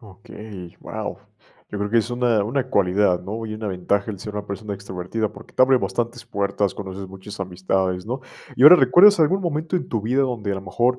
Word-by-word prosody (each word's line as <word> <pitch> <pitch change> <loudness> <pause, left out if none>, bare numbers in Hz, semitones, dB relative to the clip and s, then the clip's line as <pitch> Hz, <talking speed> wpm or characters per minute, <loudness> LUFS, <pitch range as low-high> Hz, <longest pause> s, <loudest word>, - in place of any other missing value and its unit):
Okey, 100 -3 -11
¡guao! - - -6 0.5
Yo 105 - -5
creo 100 0 -2
que 115 - +4
es 115 +1 -1
una 120 -3 +1
una 130 +5 -2
cualidad, 95 -3 +2
¿no?, 110 +5 -5
y 110 - -5
una 110 -1 -5
ventaja 100 +3 -1
el 100 - -7
ser 105 +1 -8
una 105 0 -5
persona 100 +1 -5
extrovertida 100 +2 -4
porque - - -14
te - - +4
abre 130 0 +5
bastantes 120 -1 -3
puertas, 100 -3 -1
conoces 95 -1 -7
muchas 95 +2 -10
amistades, 95 0 -2
¿no? 125 +3 -3 0.4
Y - - +1
ahora, 155 +6 +11
¿recuerdas 175 +8 +6
algún 180 +5 +3
momento 160 +1 -1
en 180 - -4
tu 115 - -1
vida 125 +6 +1
donde, 115 -6 -2
a - - -1
lo 95 - -6
mejor, 120 +7 0
105 Hz, 215 wpm, -22 LUFS, 95-125 Hz, 0.5 s, ahora